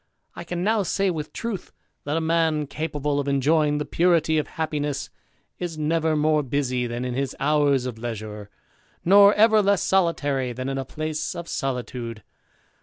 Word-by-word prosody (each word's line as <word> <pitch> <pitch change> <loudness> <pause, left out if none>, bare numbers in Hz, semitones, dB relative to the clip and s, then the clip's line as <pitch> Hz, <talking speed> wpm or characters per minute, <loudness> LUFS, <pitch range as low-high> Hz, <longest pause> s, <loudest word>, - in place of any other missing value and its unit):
I - - -6
can 175 0 -4
now 215 +1 +2
say, 195 0 0
with 155 -3 -5
truth, 230 -5 -5 0.3
that 145 +2 -1
a - - 0
man, 160 -2 +1
capable 145 -1 -2
of 140 - -2
enjoying 145 +2 +2
the 150 - -2
purity 165 -3 +2
of 150 - -3
happiness, 150 -4 -3 0.5
is 175 -3 -4
never 160 +1 +1
more 155 0 +2
busy 130 -2 -1
than 120 +1 -4
in 125 - -3
his 135 +1 -2
hours 145 -2 +2
of 120 -3 -5
leisure, 105 -3 -6 0.6
nor 200 +2 +8
ever 220 0 +5
less 200 -1 +2
solitary 145 -9 +1
than 130 +2 -4
in 135 0 -2
a 135 - -4
place 155 +3 -4
of 170 -1 -6
solitude. 125 - -4
150 Hz, 170 wpm, -24 LUFS, 135-165 Hz, 0.6 s, nor